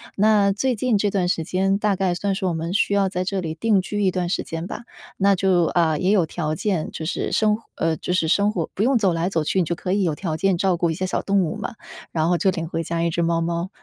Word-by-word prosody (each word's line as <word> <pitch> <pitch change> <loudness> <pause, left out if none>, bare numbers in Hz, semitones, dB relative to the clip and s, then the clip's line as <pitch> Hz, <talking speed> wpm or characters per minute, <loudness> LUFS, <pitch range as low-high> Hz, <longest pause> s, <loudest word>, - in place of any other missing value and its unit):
那 205 -1 +4
最 250 +6 0
近 230 0 +1
这 205 +1 +1
段 180 -3 0
时 165 - 0
间， 190 +3 +1
大 210 -1 +1
概 185 -1 0
算 200 +2 -1
是 190 - -3
我 180 - +1
们 165 +2 -3
需 200 0 +1
要 200 -1 +3
在 180 -1 -2
这 195 +1 -2
里 160 -3 -4
定 210 +3 +2
居 205 +2 -3
一 190 - +3
段 180 -1 -2
时 175 - -1
间 165 +1 -5
吧， - - -6 0.4
那 200 0 +4
就， 180 -2 +2
呃， 160 -2 +2
也 190 +2 +2
有 190 -5 +3
条 155 -1 -3
件， 185 -3 -1
就 160 - -6
是 - - -2
生 215 -1 +3
活 230 - -12
呃， 165 -1 0
就 180 - -4
是 170 -3 +1
生 200 +5 +3
活 175 -6 -3
不 200 - -1
用 260 +2 +3
走 195 -6 +2
来 170 +3 0
走 165 -5 0
去， 190 - 0
你 180 - +2
就 170 - -1
可 180 +2 -3
以 200 - +1
有 165 -4 +1
条 160 -2 -3
件 190 +1 +1
照 185 0 +2
顾 170 -1 0
一 - - -1
些 185 +4 -3
小 185 - -1
动 200 0 +2
物 170 - -3
嘛， 225 +3 -5 0.4
然 160 -1 0
后 175 0 +2
就 190 - +2
领 165 -2 -4
回 165 0 -3
家 165 +1 -2
一 170 - +1
只 170 +1 -1
猫 165 0 +1
猫。 170 +2 -2
185 Hz, 310 characters per minute, -22 LUFS, 170-200 Hz, 0.4 s, 那